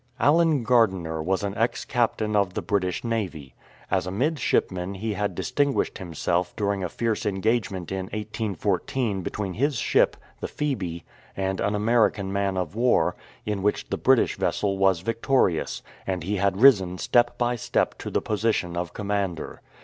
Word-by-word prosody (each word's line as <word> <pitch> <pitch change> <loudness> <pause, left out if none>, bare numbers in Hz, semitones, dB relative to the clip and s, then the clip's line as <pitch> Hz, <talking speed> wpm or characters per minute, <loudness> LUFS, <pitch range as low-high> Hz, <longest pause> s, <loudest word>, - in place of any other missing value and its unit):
Allen 155 -3 +4
Gardiner 95 -10 +2
was 95 +4 0
an 100 0 -2
ex 115 +2 0
captain 110 -3 0
of 100 -3 +1
the - - -2
British 95 -1 -1
Navy. 90 - -3 0.4
As 95 -1 +1
a - - -3
midshipman 100 - 0
he 110 +3 -3
had 105 +1 -2
distinguished 145 -1 0
himself 90 0 -1
during 100 -2 -1
a 90 - -2
fierce 115 +1 -1
engagement 100 -3 -1
in 95 -1 -2
1814 105 +1 -2
between 95 +1 -4
his 140 - 0
ship, 115 - +2 0.2
the - - -3
Phoebe, 95 - -3 0.3
and 95 0 -1
an 105 +1 +1
American 105 -3 +2
man 100 -1 0
of 90 -2 -2
war, 120 +3 +2 0.3
in 105 -2 -2
which 105 +2 0
the - - +1
British - - +3
vessel 100 -1 0
\vas 95 -3 +3
victorious; 115 -4 0 0.2
and 95 -3 -2
he 100 +4 -1
had 95 0 +1
risen 95 -9 +6
step 120 +5 +2
by 120 0 +1
step 115 - 0
to - - -5
the - - -1
posi 110 +1 +1
tion 85 -1 -3
of 85 -1 -3
commander. 100 -4 -3
100 Hz, 165 wpm, -25 LUFS, 95-115 Hz, 0.4 s, risen